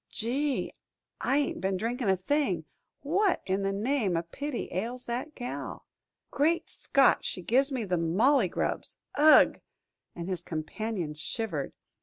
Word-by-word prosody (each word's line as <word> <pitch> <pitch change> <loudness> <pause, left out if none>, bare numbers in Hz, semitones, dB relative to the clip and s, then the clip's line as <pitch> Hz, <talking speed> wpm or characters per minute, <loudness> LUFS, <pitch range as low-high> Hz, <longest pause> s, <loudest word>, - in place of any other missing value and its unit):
"Gee, 270 +5 -1 0.5
I 275 - +1
ain't 290 -9 0
been 190 0 0
a - - -1
drinkin' 230 +2 -1
a 190 - +3
thing 285 +11 0 0.4
what 370 +7 +1
in 190 +1 0
the 195 0 0
name 210 -3 0
o' 165 - -1
pity 275 - -4
ails 235 +7 -3
that 250 +6 -4
gal!" 245 -1 -6 0.5
"Great 320 +4 +2
Scott; 275 -1 +3
she 180 - -2
gives 265 +8 +3
me 255 -4 -1
the 180 -4 0
mauley 210 - +3
grubs! - - -3 0.2
Ugh!" 305 +1 +6 0.5
and 170 0 -5
his 185 -2 -2
companion 170 +1 -4
shivered. 155 - -3
230 Hz, 150 wpm, -29 LUFS, 185-275 Hz, 0.5 s, Ugh